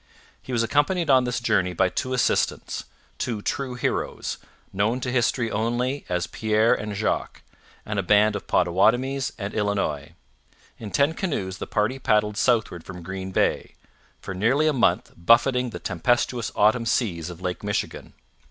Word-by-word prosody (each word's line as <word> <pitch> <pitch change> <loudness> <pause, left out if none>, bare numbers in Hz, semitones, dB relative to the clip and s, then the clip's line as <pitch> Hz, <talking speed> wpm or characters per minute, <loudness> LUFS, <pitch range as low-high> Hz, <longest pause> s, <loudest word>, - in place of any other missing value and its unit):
He - - -9
was 120 -2 +1
accompanied 145 +6 +1
on 130 -1 +5
this 125 0 -1
journey 90 -6 +1
by 95 +2 +2
two 130 +7 -3
assistants 130 - 0 0.3
two 110 -4 -3
true 130 -3 -2
heroes 125 - -2 0.3
known 105 +6 +1
to 125 - -2
history 120 -1 +1
only 120 +5 -1
as 90 -1 0
Pierre 110 +1 +2
and 105 -1 -4
Jacques, 105 +2 -2 0.4
and 105 -1 -2
a - - +2
band 105 +2 +4
of 100 - -6
Potawatomis 120 +10 +2
and 100 -2 -5
Illinois. 100 -8 -1 0.7
In 110 - -6
ten 140 +8 +2
canoes 100 - -3
the - - -5
party 110 +5 0
paddled 105 -3 +1
southward 110 -8 +1
from 90 -2 -9
Green 95 +1 -5
Bay, 95 - 0 0.4
for 95 - -6
nearly 120 +11 +2
a 155 - +3
month 130 - +1
buffeting 125 +7 +3
the - - -6
tempestuous 120 +5 0
autumn 115 +3 +3
seas 90 -10 0
of 85 -1 -9
Lake 90 +1 -4
Michigan. 100 0 -3
110 Hz, 160 wpm, -24 LUFS, 95-125 Hz, 0.7 s, on